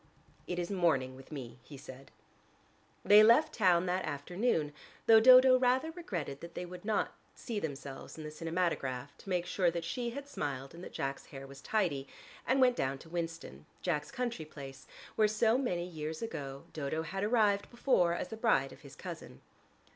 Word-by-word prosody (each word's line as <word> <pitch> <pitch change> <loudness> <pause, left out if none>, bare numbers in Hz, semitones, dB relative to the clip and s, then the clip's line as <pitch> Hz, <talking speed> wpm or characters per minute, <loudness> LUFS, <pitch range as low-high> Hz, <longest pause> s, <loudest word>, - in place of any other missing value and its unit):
"It 180 - -3
is 175 +2 -2
morning 155 -9 +1
with 135 +3 -14
me," 130 -5 -7
he 145 - -12
said. 135 0 -11 1.0
They 205 +1 +9
left 270 +8 +5
town 180 -4 +3
that 185 +1 0
afternoon, 155 - -1 0.3
though 225 -1 +8
Dodo 255 +2 +8
rather 260 +5 +2
regretted 175 - -5
that 170 0 -10
they 180 - -4
would 180 +2 -10
not 215 -1 0 0.2
see 225 -4 -4
themselves 140 -4 -6
in 155 - -7
the 150 - -6
cinematograph 155 -5 -2
to - - -11
make 180 -2 0
sure 180 0 +2
that 170 0 -3
she 240 +8 -3
had 280 +4 -7
smiled 140 - -4
and 170 +2 -10
that - - -8
Jack's 135 0 -4
hair 135 -2 -9
was 135 0 -12
tidy, 165 -11 0 0.4
and 260 +3 +3
went 250 -2 +4
down 135 +1 -1
to 160 - -14
Winston, 165 - -5 0.2
Jack's 150 -5 -1
country 245 -9 -3
place, 135 -3 -10 0.3
where 215 - +4
so 220 +2 +2
many 180 -10 -1
years 160 0 -5
ago 140 -11 -5
Dodo 155 +1 -2
had 195 +5 -4
arrived 210 -2 +2
before 235 -9 +2
as 180 - -4
the 220 - -6
bride 215 - +2
of - - -16
his - - -13
cousin. - - -9
175 Hz, 185 wpm, -32 LUFS, 145-220 Hz, 1.0 s, They